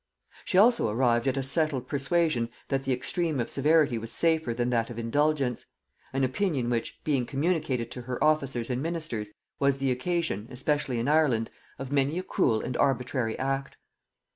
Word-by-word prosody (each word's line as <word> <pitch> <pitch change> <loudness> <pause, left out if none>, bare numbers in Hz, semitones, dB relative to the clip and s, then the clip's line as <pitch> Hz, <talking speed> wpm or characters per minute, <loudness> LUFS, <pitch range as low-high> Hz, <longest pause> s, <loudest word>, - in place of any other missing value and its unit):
She 185 - 0
also 230 - +5
arrived 120 +2 +2
at 135 +1 +1
a 135 - 0
settled 135 -2 0
persuasion 140 -3 +1 0.2
that 135 -1 -1
the 135 - 0
extreme 145 +4 -1
of 120 - -2
severity 145 -4 +3
was 115 0 -6
safer 160 -6 +2
than 120 +1 -1
that 115 -1 +1
of 120 - -8
indulgence; 135 +2 0 0.4
an 135 0 0
opinion 130 -2 0
which, 115 -1 -2
being 135 -5 0
communicated 140 -5 -1
to 125 - -6
her 125 +2 -3
officers 135 -6 +1
and 125 +1 -1
ministers, 155 -10 -3 0.3
was 140 -1 +2
the 135 -1 0
occasion, 130 - -1
especially 135 0 -1
in 115 +2 -1
Ireland, 145 -7 +2 0.3
of 135 0 -6
many 140 +3 +1
a 185 - -2
cruel 110 -10 +1
and 125 - -4
arbitrary 125 -3 0
act. 135 +1 -2
135 Hz, 170 wpm, -28 LUFS, 120-155 Hz, 0.4 s, also